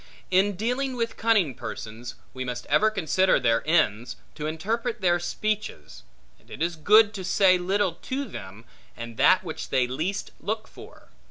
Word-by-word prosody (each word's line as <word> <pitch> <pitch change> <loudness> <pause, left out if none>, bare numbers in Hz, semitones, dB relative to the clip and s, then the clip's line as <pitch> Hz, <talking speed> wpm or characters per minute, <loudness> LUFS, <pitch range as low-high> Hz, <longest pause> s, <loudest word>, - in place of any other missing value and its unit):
In 195 +2 +3
dealing 250 +6 -1
with 230 -1 -2
cunning 215 - +2
persons, 115 +1 -7 0.2
we 130 - -4
must 125 -1 -5
ever 215 +9 +5
consider 190 -2 +2
their 115 -2 +2
ends, 120 -8 +1 0.2
to 150 - -5
interpret 225 +9 -2
their 175 -2 +3
speeches; 175 - -4 0.4
and - - -26
it - - -9
is 170 0 -1
good 210 +6 +5
to 195 -3 -6
say 185 0 +4
little 190 0 0
to 265 +10 -4
them, 105 - -10 0.3
and 120 -1 -7
that 185 - +5
which 160 -3 -6
they 130 -2 +2
least 160 +11 -3
look 215 +1 -3
for. - - -15
180 Hz, 165 wpm, -25 LUFS, 130-215 Hz, 0.4 s, ever